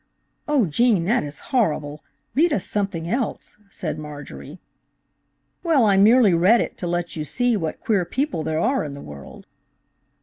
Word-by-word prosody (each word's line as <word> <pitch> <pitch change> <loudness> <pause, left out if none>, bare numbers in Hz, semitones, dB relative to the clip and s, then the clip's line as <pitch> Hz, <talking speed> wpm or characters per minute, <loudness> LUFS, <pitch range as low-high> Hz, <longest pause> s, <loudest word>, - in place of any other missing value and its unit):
"Oh 290 -6 +3
Gene, 195 +2 +2
that 235 +7 +2
is 145 0 -6 0.2
horrible; 150 - 0 0.3
read 320 +7 +3
us 200 - 0
something 195 -5 -2
else," 235 +1 -3
said 165 -5 -5
Marjorie. 150 +2 -9 1.0
"Well, 315 -9 +3
I 200 -2 +4
merely 210 +1 +5
read 185 +8 +5
it - - -3
to 175 - -3
let 175 0 -2
you 155 - -3
see 245 - 0
what 165 -6 -3
queer 205 -5 +1
people 260 - -2
there 155 0 -2
are 260 +8 +1
in 145 -2 -6
the - - -9
world." 70 -2 -11
190 Hz, 165 wpm, -22 LUFS, 155-240 Hz, 1.0 s, merely